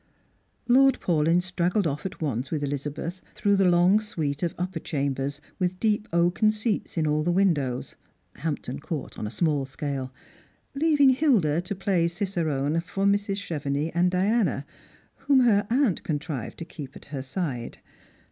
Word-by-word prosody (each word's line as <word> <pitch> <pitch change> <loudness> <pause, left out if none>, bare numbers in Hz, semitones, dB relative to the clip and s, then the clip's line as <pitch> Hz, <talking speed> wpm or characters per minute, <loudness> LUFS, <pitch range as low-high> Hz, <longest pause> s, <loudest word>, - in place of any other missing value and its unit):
Lord 265 +1 +5
Paulyn 165 +1 +2
straggled 180 +2 0
off 150 +3 -2
at - - -11
once 130 -4 -2
with 150 -2 -2
Elizabeth 150 +5 -4
through 200 -1 +2
the 195 -2 +4
long 175 +4 +5
suite 155 -9 -3
of 170 -2 -1
up[)er 180 -1 -3
chambers, 140 -1 -2 0.2
with 185 0 -1
deep 215 -1 +1
oaken 175 +5 +3
seats 215 -3 -2
in 160 - +2
all 150 0 +1
the 175 +3 +1
windows— 155 -10 +1 0.4
Hamjiton 140 -3 -4
Court 150 -1 -5
on 105 - -3
a - - -4
small 150 +1 0
scale 135 -2 -4 0.3
— - - -37
■ - - -4
leaving 295 -4 +5
Hilda 220 - +3
to 180 +3 -5
play 185 -3 +1
cicerone 165 -5 -1
for 195 +3 -3
Mrs. 200 0 +2
Clievenix 145 0 -2
and 175 +2 +3
Diana, 190 - +1 0.5
whom 275 -2 +3
her 205 -5 +3
aunt 245 - +2
contrived 150 -5 -4
to 165 - -6
keep 145 -5 -9
at - - -11
her 135 - -2
side. 130 -3 -4
170 Hz, 165 wpm, -26 LUFS, 145-200 Hz, 0.5 s, Lord